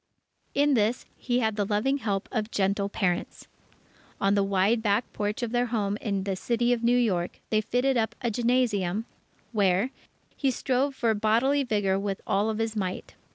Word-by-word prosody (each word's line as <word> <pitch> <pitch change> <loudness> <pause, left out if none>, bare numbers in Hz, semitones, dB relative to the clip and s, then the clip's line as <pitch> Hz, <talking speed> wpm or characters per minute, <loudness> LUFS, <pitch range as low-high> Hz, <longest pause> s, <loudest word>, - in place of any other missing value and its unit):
In 285 +1 +3
this, 230 0 +1
he 245 0 -1
had 220 -2 0
the 205 - +2
loving 215 +8 0
help 200 -5 -2
of 220 -2 -2
gentle 200 -1 0
parents. 180 -4 -2 0.7
On 195 0 +2
the 200 - +3
wide 195 +4 +2
back 210 +2 0
porch 210 +3 -2
of 235 - -2
their 245 0 +1
home 205 -4 -1
in 200 -3 -1
the 195 -1 -2
City 240 +4 +1
of 235 -1 -3
New 240 +1 +4
York, 185 -8 0
they 215 -1 +3
fitted 250 +4 +1
up 220 -1 0
a 240 -3 -1
gymnasium, 225 -4 +1 0.5
where 200 +2 +2 0.4
he 275 - +1
strove 265 +2 0
for 230 -3 +1
bodily 230 +7 +2
vigour 205 -5 +1
with 200 -1 -3
all 205 +3 +1
his 225 0 -2
might. 185 -3 -4
220 Hz, 175 wpm, -27 LUFS, 200-245 Hz, 0.7 s, New